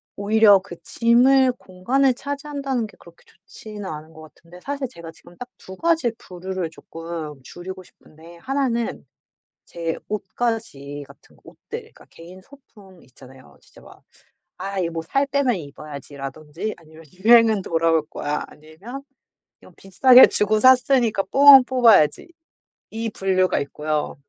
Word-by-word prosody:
오히려 205 0 +4
그 180 - -10
짐을 255 +3 +3
공간을 250 +7 0
차지한다는 280 -4 -4
게 205 - -20
그렇게 170 0 -19
좋지는 205 +2 -12
않은 155 -2 -8
것 160 - -14
같은데 170 +1 -17
사실 280 +2 -4
제가 170 -7 -11
지금 175 +1 -20
딱 250 - -8
2 190 - -12
가지 325 - 0
부류를 185 -1 -6
쪼끔 165 -3 -8
줄이고 185 +5 -10
싶은데 165 0 -18
1 270 +9 -2
는 235 -8 -4 0.6
제 165 -1 -4
옷가지 210 -10 -4
같은 - - -20
옷들 - - -9
그러니까 - - -19
개인 175 +3 -14
소품 205 -9 -19
있잖아요. 130 0 -18
진짜 - - -20
막 - - -17 0.6
'아 195 0 -5
이 175 - 0
뭐 165 -1 -5
살 275 +13 -1
빼면 275 -4 0
입어야지.'라든지 150 +4 -8
아니면 160 -1 -17
'유행은 220 +1 +4
돌아올 165 -1 +1
거야.' 150 +1 -4
아니면 185 - -12 0.6
좀 - - -18
'비싸게 250 +7 +6
주고 215 +1 0
샀으니까 255 -3 +4
뽕은 275 -2 +8
뽑아야지.' 240 - +3 0.6
이 225 +1 -4
분류가 190 -2 0
있고요. 150 +1 -3
190 Hz, 300 characters per minute, -21 LUFS, 165-245 Hz, 0.6 s, 뽕은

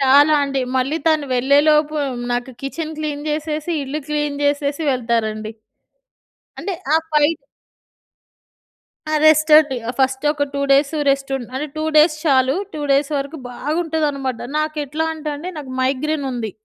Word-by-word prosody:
చాలా 285 +3 +6
అండి. 275 -1 -2 0.2
మళ్ళీ 270 +5 0
తను 310 -2 +2
వెళ్ళేలోపు 300 +4 +3 0.4
నాకు 245 +2 -2
కిచెన్ 315 +3 -4
క్లీన్ 295 -1 -3
జేసేసి 305 +2 -2
ఇల్లు 290 +3 -4
క్లీన్ 295 -1 -1
జేసేసి 285 +1 0
వెళ్తారండి. 225 -3 -1 1.1
అంటే 400 - -3 0.2
ఆ - - +7
ఫైట్ 300 +1 +3 1.8
ఆ! - - +2
రెస్ట్ 310 0 +5
అండి. 295 -4 +4
ఆ - - +1
ఫస్ట్ 265 +1 +1
ఒక 290 -1 0
2 280 - -1
డేస్ 280 +2 +3 0.2
రెస్ట్. 275 0 +1
ఉం 255 - -5
అంటే, 280 +3 -2
2 310 - -2
డేస్ 305 +1 +6
చాలు 265 -2 +3 0.2
2 300 - -4
డేస్ 280 +2 +2
వరకు 280 +3 -5
బాగుంటుందన్నమాట. 295 -3 -2 0.2
నాకు 310 0 -2
ఎట్లా 315 +4 -2
అంటే 305 -1 -5
అండి 345 +5 -6
నాకు 265 -3 -8
మైగ్రేన్ 280 +3 -1
ఉంది. 230 -3 -3
290 Hz, 150 wpm, -20 LUFS, 270-310 Hz, 1.8 s, ఆ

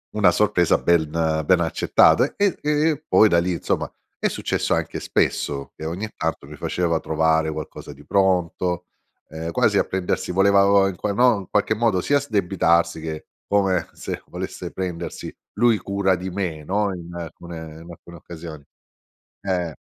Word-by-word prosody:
una 105 -4 +5
sorpresa 90 -3 +3
ben 85 -3 +2 0.4
ben 90 +3 +4
accettata 80 -2 +4
e 200 -3 +2
e 150 - 0 0.2
e 155 -1 -3
poi 110 - +6
da 85 - +4
lì 90 +2 0
insomma 85 - -2 0.3
è - - 0
successo - - -1
anche - - -2
spesso 70 -1 -1
che - - -10
ogni 90 +7 -3
tanto 80 -1 -3
mi - - -10
faceva 85 -2 -1
trovare 80 0 +1
qualcosa 75 -1 -7
di 70 +2 -17
pronto, 90 -1 +1 0.4
ehm 80 +2 -5
quasi - - +2
a - - +4
prendersi, 95 -1 -2
voleva 100 +2 +4
v - - +3
vo 100 - +6 0.3
no, 120 +1 +4
in 95 - -10
qualche 105 +1 +1
modo 110 -4 +1
sia 145 +9 +2
sdebitarsi, 90 - +1
che 80 -1 -6 0.2
come 95 -4 +1
se - - -6
volesse - - -6
prendersi 90 -3 -5 0.2
lui 120 0 +4
cura 100 +1 0
di 90 +1 -5
me, 90 -5 -3
no, 100 +4 0
in 85 -1 -9
alcune 85 0 -8 0.2
in 85 - -13
alcune 85 +1 -13
occasioni. 80 -3 -10 0.8
Eh. 90 -4 -2
90 Hz, 165 wpm, -22 LUFS, 80-100 Hz, 0.8 s, poi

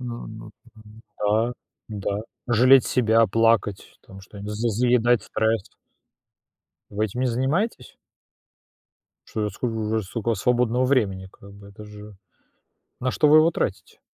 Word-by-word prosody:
Ну, 120 -2 -7
ну, - - -10 0.2
ну 110 0 -16 0.2
да, 110 +3 +1 0.4
да, 100 -1 -3 0.3
жалеть 125 +3 +5
себя, 115 -2 +3
плакать, 115 -1 0
там 95 0 -13
что-нибудь, 100 +2 -9
з 115 +3 -1
заедать 120 +1 +2
стресс. 110 -2 -1 1.3
Вы 105 +1 -1
этим 110 +4 -7
не 130 - +1
занимаетесь? 130 - -2 1.3
Что 105 -1 -2
ж - - -11
скол 110 -1 -2
сколько 110 +4 -7
у - - +4
вас 110 - -2
свободного 125 +2 +1
времени 100 -8 0
как 100 0 -16
бы 100 0 -14
это 100 +1 -13
же... 105 0 -12 0.8
На 130 0 -2
что 150 - +3
вы 150 - +7
его 160 +2 +5
тратите? - - -4
110 Hz, 145 wpm, -23 LUFS, 105-125 Hz, 1.3 s, вы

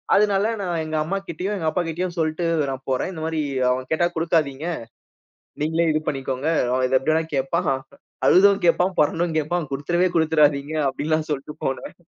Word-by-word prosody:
அதனால 205 +1 +3
நான் 175 -4 -2
எங்க 155 0 -4
அம்மா 195 +5 -2
கிட்டயும், 185 +6 -3
எங்க 165 -5 -2
அப்பா 180 +3 0
கிட்டயும் 175 +2 -3
சொல்ட்டு 155 +1 -1 0.3
நான் 135 0 -6
போறேன். 130 - 0
இந்த 160 -4 -7
மாரி 160 -1 -1 0.3
அவன் 130 0 -1
கேட்டா 160 +2 +2
குடுக்காதீங்க. 160 -2 0 0.9
நீங்களே 160 +2 +1
இது 155 - +1
பண்ணிக்கோங்க. 135 0 -2 0.3
அவன் 130 0 +2
இத 130 - +3
எப்டி 135 - 0
வேணா 160 - +2
கேப்பான். 135 +4 0 0.6
அழுதும் 200 +2 +6
கேப்பான், 180 +2 +3
புரண்டும் 165 +2 +1
கேப்பான். 155 0 -1
குடுத்துறவே, 175 +6 +1
குடுத்துடாதீங்க! 150 -2 +2
அப்படிலாம் 155 +3 -1
சொல்லிட்டு 150 +1 -3
போனேன். 135 - -3
160 Hz, 165 wpm, -23 LUFS, 145-175 Hz, 0.9 s, அழுதும்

